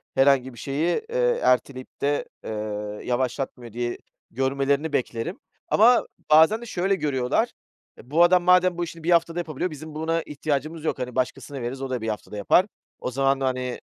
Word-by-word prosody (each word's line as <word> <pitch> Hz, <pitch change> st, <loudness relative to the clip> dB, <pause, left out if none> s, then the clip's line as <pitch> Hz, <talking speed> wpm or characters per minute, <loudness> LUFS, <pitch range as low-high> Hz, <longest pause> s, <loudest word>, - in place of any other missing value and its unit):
herhangi 135 Hz, -1 st, +3 dB
bir 120 Hz, -, -12 dB
şeyi, 150 Hz, -, 0 dB
eee, -, -, +1 dB
erteleyip 130 Hz, +1 st, 0 dB
de, 145 Hz, +1 st, +1 dB, 0.2 s
eee, -, -, -6 dB, 0.6 s
yavaşlatmıyor, 125 Hz, -1 st, -2 dB
diye 120 Hz, 0 st, -2 dB, 0.3 s
görmelerini 140 Hz, +4 st, 0 dB
beklerim. 125 Hz, +5 st, -2 dB, 0.3 s
Ama 235 Hz, +3 st, +5 dB, 0.2 s
bazen 160 Hz, +9 st, +6 dB
de -, -, -7 dB
şöyle 195 Hz, -3 st, 0 dB
görüyorlar. 135 Hz, -6 st, 0 dB, 0.5 s
E, 125 Hz, -, -16 dB
bu 165 Hz, +3 st, +5 dB
adam 180 Hz, 0 st, +5 dB
madem 180 Hz, 0 st, +4 dB
bu 175 Hz, -, -1 dB
işini 165 Hz, -1 st, -8 dB
bir 175 Hz, -, +1 dB
haftada 170 Hz, 0 st, +3 dB
yapabiliyor 170 Hz, +1 st, -3 dB
bizim 155 Hz, +1 st, -9 dB
buna 165 Hz, +1 st, 0 dB
ihtiyacımız 150 Hz, +1 st, -3 dB
yok, 155 Hz, -, -1 dB
hani, 125 Hz, -1 st, -4 dB
başkasına 130 Hz, +1 st, -2 dB
veririz, 125 Hz, +3 st, -4 dB
o 135 Hz, -, -3 dB
da 125 Hz, -2 st, -2 dB
bir 110 Hz, -, -2 dB
haftada 105 Hz, -1 st, -5 dB
yapar. 140 Hz, -, +4 dB, 0.3 s
O 125 Hz, -, -4 dB
zaman, 135 Hz, +1 st, +2 dB
hani, 130 Hz, -2 st, -2 dB
140 Hz, 170 wpm, -24 LUFS, 130-170 Hz, 0.6 s, bazen